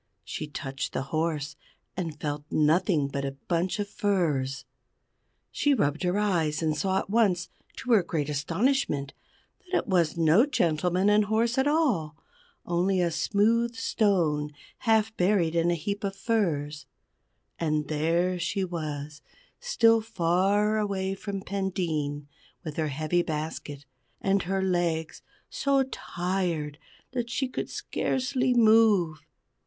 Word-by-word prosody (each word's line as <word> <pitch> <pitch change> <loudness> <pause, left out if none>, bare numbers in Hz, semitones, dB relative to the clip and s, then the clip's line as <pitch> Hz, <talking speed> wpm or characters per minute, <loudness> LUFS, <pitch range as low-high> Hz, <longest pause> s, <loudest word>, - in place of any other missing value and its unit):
She 155 - -5
touched 135 -2 -5
the - - -1
horse, 155 -2 -1 0.4
and 165 -5 -4
felt 145 -1 -3
nothing 155 0 +2
but 140 0 -4
a 135 0 -3
bunch 170 +6 -2
of 205 -1 -2
furze. 155 -11 -1 0.9
She 290 -1 +2
rubbed 145 - 0
her 180 +1 +1
eyes 165 -7 +1
and 155 -1 +1
saw 190 +5 0
at - - -2
once, 200 -6 +2 0.3
to 250 - -4
her 220 -4 +6
great 160 -4 -2
astonishment, 150 - 0 0.6
that 370 - +2
it - - -2
was 170 -5 +2
no 170 - +5
gentleman 180 - +1
and 210 0 +4
horse 225 +3 +1
at 265 - +2
all, 235 - +1 0.5
only 180 +2 +1
a 175 -1 +1
smooth 230 +7 +1
stone 170 -12 +1 0.3
half 220 -2 +2
buried 180 -3 +2
in 170 0 +2
a 175 - +2
heap 200 +6 -4
of 195 -1 -2
furze. 160 -9 -1 0.7
And 155 -2 0
there 170 +4 +1
she 190 +3 -1
was 150 -4 -5 0.4
still 230 - +3
far 200 +3 +1
away 195 -2 -1
from 195 0 -5
Pendeen, 165 -8 -2 0.4
with 155 -4 -6
her 160 -1 0
heavy 155 +4 0
basket, 150 -3 -5 0.3
and 195 0 +1
her 190 +2 -1
legs 175 -3 -1 0.3
so 275 -1 +2
tired 175 - -3 0.3
that 240 -2 -3
she 265 +3 -1
could 255 - -4
scarcely 255 -1 -1
move. 215 -8 +4
180 Hz, 135 wpm, -27 LUFS, 155-210 Hz, 0.9 s, her